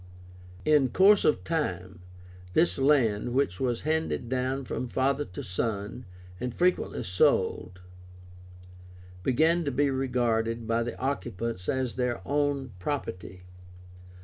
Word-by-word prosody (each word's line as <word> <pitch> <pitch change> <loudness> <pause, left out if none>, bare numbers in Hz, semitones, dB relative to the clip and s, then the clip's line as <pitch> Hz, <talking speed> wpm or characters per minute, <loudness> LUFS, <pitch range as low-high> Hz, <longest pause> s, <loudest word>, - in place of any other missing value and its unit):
In 150 -4 +4
course 195 - +5
of 150 - +2
time, 95 - -3 0.5
this 90 +1 +2
land, 125 -5 +2
which 130 -10 +1
was 120 -3 -1
handed 160 -6 -1
down 130 +1 -1
from 125 - -3
father 135 +4 0
to 90 - -8
son, 105 +5 -3 0.3
and 125 0 -3
frequently 180 +1 +1
sold, 90 0 +1 1.4
began 160 - +2
to 145 - -1
be 140 +2 +1
regarded 120 -3 0
by 115 +1 +1
the 120 +1 -4
occupants 115 -6 -3
as 130 -2 -1
their 125 -2 0
own 145 -2 0
property. 90 -7 -5
125 Hz, 120 wpm, -28 LUFS, 110-140 Hz, 1.4 s, course